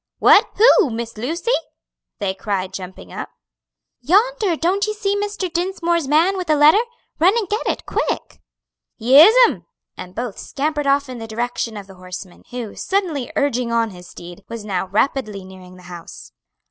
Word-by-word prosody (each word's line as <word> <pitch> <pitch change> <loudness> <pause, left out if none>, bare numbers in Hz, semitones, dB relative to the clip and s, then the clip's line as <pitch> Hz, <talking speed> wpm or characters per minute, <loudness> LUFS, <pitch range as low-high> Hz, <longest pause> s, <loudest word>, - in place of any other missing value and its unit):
"What 435 - +5
who 445 - +6
Miss 230 0 -5
Lucy?" 325 - -2 0.7
they 195 -3 -2
cried, 190 -1 -3
jumping 185 - -9
up. - - -6 0.7
"Yonder; 410 - +2
don't 375 +6 0
you 425 - -3
see 405 -1 -1
Mr. 405 -2 -2
Dinsmore's 345 -2 -1
man 330 +7 +3
with 360 -3 -5
a 305 - +4
letter? 300 +8 +6 0.4
Run 370 +8 +4
and 435 -4 -1
get 420 +4 -2
it, - - -2
quick!" - - -3 0.6
"Yes'm!" 320 - +6 0.3
and 180 0 -10
both 235 -3 -5
scampered 295 0 -2
off 280 0 +2
in 255 -2 -7
the 225 - -7
direction 230 0 -3
of 200 - -8
the 195 - -14
horseman, 185 0 -9
who, 240 -4 -6
suddenly 350 -10 -2
urging 250 -4 0
on 230 -1 +1
his 180 -1 -13
steed, 175 +3 -11
was 230 -2 -7
now 190 -2 -2
rapidly 210 -1 -1
nearing 185 -1 -13
the 180 - -16
house. 175 - -11
260 Hz, 165 wpm, -20 LUFS, -, 0.7 s, who